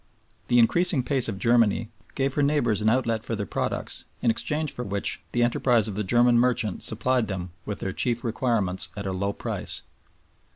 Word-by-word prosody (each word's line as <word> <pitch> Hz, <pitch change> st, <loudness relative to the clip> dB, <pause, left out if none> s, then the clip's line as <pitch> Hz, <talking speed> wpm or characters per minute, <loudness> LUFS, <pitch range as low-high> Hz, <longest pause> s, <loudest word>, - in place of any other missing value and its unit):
The 120 Hz, -, +3 dB
increasing 150 Hz, +4 st, +3 dB
pace 130 Hz, -2 st, +1 dB
of 100 Hz, -, -4 dB
Germany 115 Hz, 0 st, +2 dB, 0.2 s
gave 135 Hz, 0 st, 0 dB
her 145 Hz, -, 0 dB
neighbors 140 Hz, -8 st, +1 dB
an 110 Hz, -, +3 dB
outlet 115 Hz, -2 st, 0 dB
for 115 Hz, -, -3 dB
their 105 Hz, -1 st, -3 dB
products, -, -, -2 dB, 0.2 s
in 115 Hz, -, +4 dB
exchange 150 Hz, +6 st, -1 dB
for 125 Hz, -, -5 dB
which 100 Hz, -1 st, -3 dB
the 120 Hz, -, +1 dB
enterprise 120 Hz, -2 st, +2 dB
of 105 Hz, -, -4 dB
the 105 Hz, +2 st, -2 dB
German 120 Hz, +4 st, +4 dB
merchant 120 Hz, -5 st, +1 dB
supplied 115 Hz, +1 st, +1 dB
them 90 Hz, -3 st, -5 dB, 0.2 s
with 105 Hz, -, -4 dB
their 95 Hz, -, -3 dB
chief 120 Hz, +2 st, +1 dB
requirements 115 Hz, -6 st, 0 dB
at 100 Hz, -, -5 dB
a 95 Hz, -, -2 dB
low 100 Hz, +2 st, -1 dB
price. -, -, -4 dB
115 Hz, 190 wpm, -25 LUFS, 105-125 Hz, 0.2 s, in